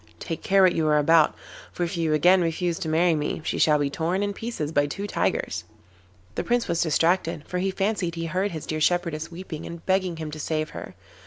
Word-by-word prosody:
Take 165 - -5
care 195 0 +4
what 185 -2 +5
you 160 -1 0
are 150 0 +4
about, 155 +1 +4 0.4
for 175 - -3
if 170 +1 -2
you 160 -2 +1
again 180 +5 +5
refuse 170 0 -1
to 160 - -3
marry 165 +2 +3
me 150 -1 -2
she - - -1
shall 150 -1 +5
be 145 -1 -1
torn 175 +6 -1
in 205 0 -1
pieces 200 -9 -4
by 145 -2 +2
two 200 +8 -5
tigers.' 205 - -1 0.7
The - - -2
Prince 240 -1 +1
was 170 -1 0
distracted, 165 0 +1
for 180 - -2
he 190 +1 0
fancied 195 -3 -1
he 165 0 -3
heard 185 +5 -1
his 160 -4 -6
dear 155 0 -3
shepherdess 165 -2 0
weeping 170 -2 -7
and 170 -1 -8
begging 185 -3 +1
him 155 -1 -5
to 155 - -7
save 155 0 -2
her. - - -8
165 Hz, 225 wpm, -25 LUFS, 155-185 Hz, 0.7 s, what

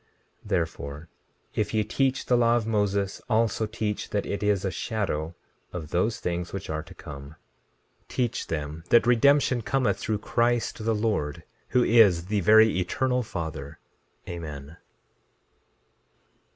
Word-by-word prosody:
16:14 - - -14
Therefore, 80 -4 -3 0.4
if 105 +1 -1
ye 110 - +3
teach 135 +4 0
the 125 - +3
law 120 -1 +4
of 120 -2 0
Moses, 100 -3 0
also 110 -1 +1
teach 105 -1 -3
that 105 - -1
it 100 - -3
is 105 -2 +1
a 95 - 0
shadow 85 -5 -3 0.4
of 80 -4 -6
those 105 +6 0
things 90 0 -3
which 100 -4 -5
are 80 0 -2
to - - -14
come— 70 +1 -10 0.7
16:15 - - -42
Teach 120 -3 -2
them 75 0 -4
that 120 - +5
redemption 125 +1 +4
cometh 110 -5 0
through 110 +1 -1
Christ 120 +1 0
the 115 0 +1
Lord, 105 -10 -1 0.2
who 125 - +3
is 100 -9 +5
the 105 +2 0
very 110 +1 +5
Eternal 125 +8 0
Father. 80 - -6 0.5
Amen. 75 -2 -7
105 Hz, 145 wpm, -26 LUFS, 85-115 Hz, 0.7 s, that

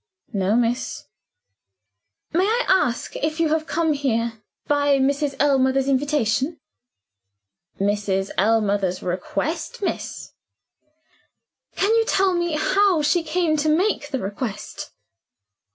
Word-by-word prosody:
"No, 195 +1 +1
miss." 240 +1 -1 1.3
"May 360 +3 +3
I 465 +4 +1
ask 295 -11 +1
if 310 +2 -2
you 325 -2 +2
have 315 0 0
come 320 -1 +1
here 230 -5 -1 0.2
by 285 -1 +2
Mrs. 280 +1 0
Ellmother's 270 -1 +2
invitation?" 275 0 0 1.2
"By 195 - -1
Mrs. 200 -1 0
Ellmother's 205 -3 +1
request, 290 - -3
miss." - - -4 1.4
"Can 405 +3 +2
you 450 - +3
tell 385 -3 +2
me 345 -2 -1
how 370 +1 +2
she 335 +4 +2
came 325 0 0
to 305 +1 +1
make 315 -2 +1
the 265 - -2
request?" 205 0 -5
285 Hz, 115 wpm, -22 LUFS, 225-325 Hz, 1.4 s, May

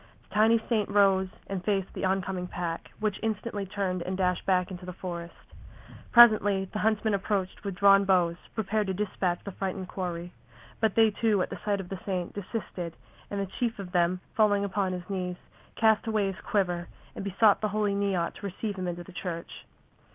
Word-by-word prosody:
The - - -18
tiny 225 +2 +5
saint 215 -4 +1
rose 195 -2 +4 0.2
and 190 -2 -4
faced 195 -1 0
the - - -2
oncoming 185 -1 -1
pack, 170 -2 -4
which 215 -2 -1
instantly 210 -2 -2
turned 190 -2 -2
and 185 +2 -3
dashed 180 -1 0
back 180 -1 +2
into 180 0 -7
the 180 0 -6
forest. 170 -1 -8 0.6
Presently 215 -5 +7
the 210 +2 -5
huntsmen 215 0 +1
approached 195 -1 -1
with 200 -2 -3
drawn 200 +1 +6
bows, 180 -3 +3 0.2
prepared 215 -1 0
to 190 - -1
dispatch 185 -3 -1
the 200 - -5
frightened 190 -1 -4
quarry. 175 -2 -4 0.5
But 220 -3 +1
they 225 -1 +5
too, 210 -2 +2
at - - -6
the - - -5
sight 205 -1 0
of 185 -2 -7
the 195 - -5
saint, 185 -3 -3
desisted, 185 -4 -5 0.3
and 200 - -3
the 200 - 0
chief 235 -2 0
of 195 -3 -7
them, 180 0 +2
falling 205 -2 +3
upon 195 -1 0
his 180 0 -6
knees, 185 -2 -3 0.4
cast 220 0 +3
away 215 -2 +1
his 190 - -11
quiver 180 -4 0 0.3
and - - -5
besought 200 +2 +4
the 215 - +1
Holy 210 0 0
Neot 195 -4 0
to - - -9
receive 200 +2 -4
him 185 -1 -3
into 175 0 -4
the 185 - -14
Church. 170 -2 -6
195 Hz, 195 wpm, -28 LUFS, 180-210 Hz, 0.6 s, Presently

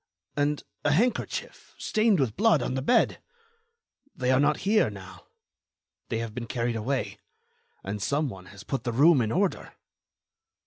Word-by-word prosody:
And 145 0 0 0.2
a 145 - +3
handkerchief, 230 +9 -1
stained 215 -4 +2
with 125 -6 0
blood, 205 - +3
on - - -2
the 130 - -1
bed. 200 - +2 0.9
They 125 0 0
are 130 - +4
not 145 +1 +2
here 215 +2 +3
now. - - -12 0.8
They 115 - -1
have 115 -1 -4
been 115 0 -5
carried 120 -1 -1
away. 125 +4 -2 0.6
And 100 +1 -4
some 145 +7 0
one 95 -6 -9
has 100 0 -12
put 135 0 -3
the 120 -1 -2
room 145 +3 +5
in 110 -1 -1
order." 190 +5 -1
135 Hz, 160 wpm, -27 LUFS, 115-155 Hz, 0.9 s, room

